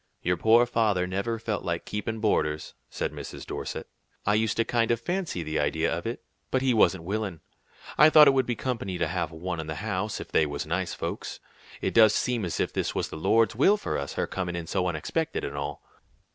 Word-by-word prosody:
"Your 90 +1 +2
poor 115 +6 +5
father 110 -6 +1
never 100 +5 -2
felt 110 -2 -3
like 85 -1 -2
keepin' 110 +2 -3
boarders," 75 -8 0 0.2
said - - -3
Mrs. - - -8
Dorset. - - -5 0.4
"I 105 - +3
used 110 0 +1
to 115 - +2
kind 115 -2 +1
of 120 -1 +2
fancy 175 - -2
the 80 0 -2
idea 80 +3 +1
of 85 - -5
it, 120 - -5 0.3
but 130 0 +1
he 130 -2 +3
wasn't 95 -6 +3
willin'. 100 -2 -3 0.6
I 150 +2 +9
thought 155 -1 +8
it 140 - +6
would 130 -2 +2
be 120 - 0
company 110 -7 -3
to 85 - +1
have 85 +1 -2
one 85 +1 -4
in 80 - -5
the 80 - -4
house, 105 +1 -2
if - - -8
they 80 - +3
was 70 0 -4
nice 85 +2 -2
folks. - - -5 0.4
It - - -1
does 110 -2 +6
seem 120 -5 0
as 85 - -3
if - - 0
this - - -2
was - - -1
the - - -7
Lord's 110 +8 +2
will 195 - +5
for - - -3
us; 70 0 -3
her - - -1
coming 90 -2 -3
in 85 -1 -4
so 90 +2 0
unexpected, 90 - -2
and 70 - -4
all." 70 0 -4
100 Hz, 225 wpm, -27 LUFS, 85-115 Hz, 0.6 s, I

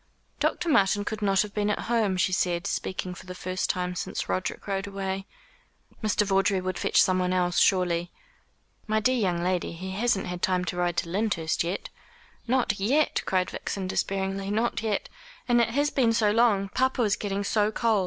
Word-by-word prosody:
"Dr. - - 0
Martin 205 - +3
could 220 0 -4
not 195 -1 +3
have 210 -1 -9
been 210 0 0
at 210 - -1
home," 220 -5 +1
she 185 0 +1
said, 175 -2 0
speaking 185 -1 -3
for 180 - -12
the 180 - -7
first 185 0 -3
time 180 0 -1
since 180 - -4
Roderick 185 - -3
rode 195 0 -2
away. 195 -1 -4 0.8
"Mr. 210 -1 +2
Vawdrey 195 0 +2
would 185 0 -3
fetch - - +2
someone 185 -1 +3
else, 180 -1 +1
surely." 175 -2 +2 0.8
"My 215 0 +2
dear 250 +4 +2
young 180 -7 0
lady, 180 -1 -1
he 185 +3 -6
hasn't 205 0 0
had 180 0 -5
time 180 -1 +1
to 175 - -3
ride 175 -1 0
to 170 0 -1
Lyndhurst 185 -5 0
yet." 175 +4 -3 0.6
"Not 240 -5 +1
yet," 275 +10 +2
cried 185 -1 +1
Vixen 195 -2 -4
despairingly, 195 +1 -2
"not 225 +3 0
yet! 215 -3 -1 0.4
And 240 -1 +4
it 230 - +2
has 285 +5 +1
been 235 -4 +2
so 220 -2 +3
long. 210 -3 +3
Papa 260 +2 +1
is 210 -2 +2
getting 200 -1 -3
so 210 +1 +1
cold. 225 -2 +2
195 Hz, 190 wpm, -27 LUFS, 185-215 Hz, 0.8 s, And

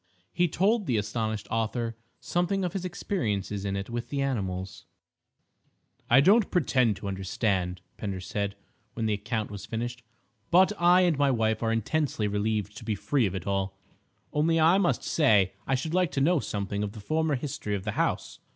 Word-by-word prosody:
He 175 - +3
told 200 +6 +1
the 120 - +2
astonished 110 0 -2
author 115 +1 -1 0.2
something 180 +2 0
of 175 - -3
his 195 - -3
experiences 105 - -2
in 100 0 -1
it 100 0 -3
with 120 0 -4
the 140 - -2
animals. 95 -9 -3 1.2
"I 130 +3 +7
don't 205 +8 +5
pretend 130 - +2
to 100 - -7
understand," 95 -1 -1 0.2
Pender 100 -3 -4
said, 100 +2 -3 0.4
when 115 - -2
the 110 - +1
account 110 +1 -3
was 100 -1 -7
finished, 120 +1 -4 0.5
"but 185 +4 +5
I 175 +1 +6
and 170 -5 +2
my 140 -1 +4
wife 110 -3 +1
are 115 -1 +1
intensely 115 0 0
relieved 105 0 -1
to - - -9
be 110 -1 -1
free 125 +3 +1
of 95 - -4
it 90 - -5
all. 95 -1 -1 0.6
Only 160 +2 +2
I 165 +5 +5
must 180 -3 +1
say 105 - +3
I 135 - +2
should 155 +5 -3
like 180 -2 +3
to - - 0
know 160 +4 +3
something 100 -4 -3
of 105 -1 -3
the 110 - -9
former 155 +7 0
history 125 -6 -3
of 95 - -4
the 105 - -2
house. - - -1
115 Hz, 185 wpm, -28 LUFS, 100-155 Hz, 1.2 s, I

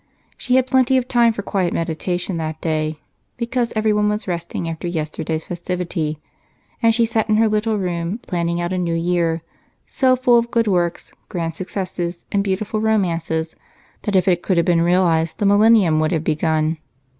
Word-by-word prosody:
She 250 - 0
had 260 -1 +4
plenty 260 0 +3
of 255 -1 -1
time 240 -2 +4
for 205 -2 -5
quiet 190 -4 -1
meditation 175 +2 -2
that 160 -1 -4
day 155 -1 -1 0.4
because 235 0 -1
everyone 210 -1 +2
was 210 0 -2
resting 170 -1 -3
after 165 +1 -4
yesterday's 160 -1 -3
festivity, 175 -3 -3 0.6
and 230 -1 +5
she 230 +1 +2
sat 225 -1 -1
in 215 - +4
her 225 +1 +4
little 215 0 0
room 175 0 -2
planning 170 -6 -2
out 175 +1 -2
a 185 - -1
new 170 -2 -1
year 170 -1 0 0.4
so 260 -2 +2
full 245 -2 +4
of 235 0 -3
good 230 -1 +1
works, 175 -3 0 0.2
grand 165 -2 -3
successes, 180 -2 -4
and 200 -1 +1
beautiful 205 +2 -2
romances 170 -7 0 0.5
that 205 - -2
if 185 -1 +3
it 175 -2 +3
could 185 - 0
have 170 - +3
been 170 -2 +3
realized, 170 -2 +2
the 205 - -1
Millennium 205 -5 +5
would 155 +3 +1
have 160 -2 0
begun. 155 0 0
180 Hz, 180 wpm, -20 LUFS, 165-215 Hz, 0.6 s, and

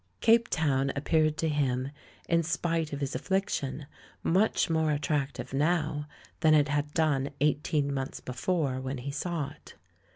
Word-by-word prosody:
Cape 230 0 +5
Town 135 -6 +1
appeared 155 +2 +2
to 165 - 0
him, 135 -3 0 0.4
in 170 0 +3
spite 165 -1 -1
of 145 0 -4
his 140 -1 -2
affliction, 145 -3 -1 0.4
much 190 +5 +2
more 160 -2 +1
attractive 145 -2 -1
now 150 0 0 0.3
than 155 -1 +5
it 145 -1 +4
had 145 0 0
done 145 -4 +2
eighteen 145 -1 +1
months 135 -1 -3
before, 130 0 -1
when 130 +1 -3
he 130 +3 -5
saw 150 0 -2
it. - - -16
150 Hz, 150 wpm, -29 LUFS, 140-160 Hz, 0.4 s, Cape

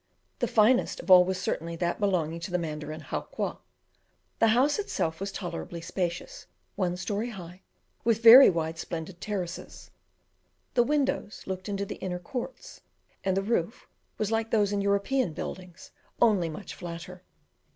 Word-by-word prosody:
The - - +1
finest 230 +3 +3
of - - -2
all 180 -1 +10
was 185 0 -2
certainly 170 -2 -3
that 175 +1 -1
belonging 170 -5 0
to 170 - -6
the 180 - 0
Mandarin 155 -2 -5
Howqua. - - -4 0.8
The 225 - +5
house 260 - +3
itself 165 - -2
was 195 +1 -3
tolerably 175 -3 -5
spacious, 170 - -4 0.3
one 180 - -1
story 205 +5 -2
high, 180 -4 -10 0.4
with 230 0 +1
very 240 +4 +11
wide, 165 -2 -2
splendid 170 +1 -6
terraces. 190 -5 -5 0.8
The 245 - +4
windows 275 -5 -1
looked 190 +1 -5
into 200 0 -2
the - - -7
inner 180 -2 -4
courts, 250 - -7 0.4
and 190 -1 +1
the 195 - +1
roof 215 -2 -1 0.3
was 215 0 -1
like 225 0 0
those 205 -3 +2
in 200 - 0
European 200 +1 +1
buildings, 180 +2 -8 0.3
only 200 -8 +3
much 180 +5 -8
flatter. 175 +1 -8
190 Hz, 150 wpm, -28 LUFS, 170-215 Hz, 0.8 s, very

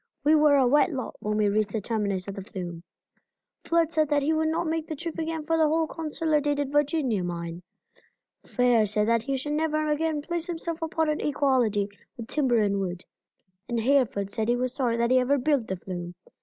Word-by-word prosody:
We 300 - +4
were 300 -2 +5
a 270 -2 +4
wet 295 +7 +4
lot 260 -4 -5
when 210 0 -2
we 210 -1 +3
reached 205 0 0
the 220 - 0
terminus 200 -3 -2
of 200 - -4
the 195 - -6
flume. 180 -4 -7 0.8
Flood 335 -1 +2
said 310 -3 +1
that 290 -1 +2
he 310 +3 +2
would 315 0 +1
not 320 +2 0
make 320 0 -2
the 315 - -4
trip 335 +2 -5
again 320 -1 -3
for 325 +1 +1
the 315 -1 +4
whole 320 +1 +2
Consolidated 300 -3 -1
Virginia 290 - +1
mine. 170 -1 -5 0.8
Fair 245 -4 +2
said 210 +1 +1
that 230 0 +3
he 270 +3 -2
should 295 +3 -3
never 310 0 0
again 300 0 0
place 340 +1 -3
himself 335 -1 -4
upon 320 0 0
an 305 0 -1
equality 255 -8 +1 0.3
with 230 -2 -7
timber 260 -4 +1
and 200 -1 0
wood, 180 -2 -4 0.6
and 235 -1 0
Hereford 225 -6 +1
said 220 +1 -2
he 240 - +3
was 250 0 -2
sorry 245 -4 0
that 235 +1 +1
he 255 - +6
ever 265 +3 +2
built 275 -3 +1
the 190 - -3
flume. 175 -1 -7
270 Hz, 210 wpm, -26 LUFS, 215-310 Hz, 0.8 s, he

